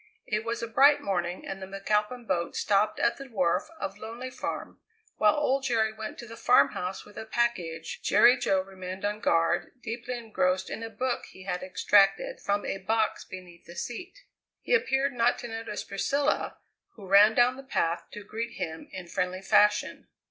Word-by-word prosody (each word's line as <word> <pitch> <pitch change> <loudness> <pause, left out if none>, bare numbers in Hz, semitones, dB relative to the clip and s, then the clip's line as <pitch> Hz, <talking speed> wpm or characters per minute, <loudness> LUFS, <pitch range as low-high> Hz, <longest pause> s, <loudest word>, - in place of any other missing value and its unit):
It 215 0 -1
was 230 +1 -3
a - - -2
bright 280 +6 +5
morning 180 -7 -2
and 195 0 -6
the 190 - -6
McAlpin 210 +5 -1
boat 170 -2 -1
stopped 210 +1 +1
at 235 - +2
the 275 -1 -9
wharf 185 -7 +1
of 195 +1 -5
Lonely 235 +4 -7
Farm. - - -5 0.4
While 210 -1 +4
old 275 -2 +1
Jerry 225 -4 +1
went 220 0 -7
to 240 - -8
the 230 0 -10
farmhouse 180 +3 +2
with 205 - -16
a - - -6
package, 185 -9 -2
Jerry 245 - +6
Jo 190 -6 +1
remained 190 0 -7
on 210 +1 -1
guard 165 -2 +1
deeply 240 +2 -4
engrossed 185 -5 -1
in - - -5
a 225 - -5
book 255 +2 -2
he 185 - -13
had 180 -1 -3
extracted 195 +1 +3
from 205 0 -1
a 195 - -3
box 220 +3 0
beneath 180 -2 -11
the 170 - -12
seat. 360 - -7 0.4
He - - -1
appeared 275 - +2
not 240 0 +2
to 240 - -6
notice 225 -2 -5
Priscilla, 280 +9 -1 0.4
who 205 - -12
ran 205 +3 +6
down 245 +1 +4
the 270 - -9
path 170 -10 -1
to 210 - -7
greet 230 +3 -5
him 160 0 -6
in 185 -2 -8
friendly 185 +2 -2
fashion. 210 +1 +3
210 Hz, 185 wpm, -28 LUFS, 185-235 Hz, 0.4 s, Jerry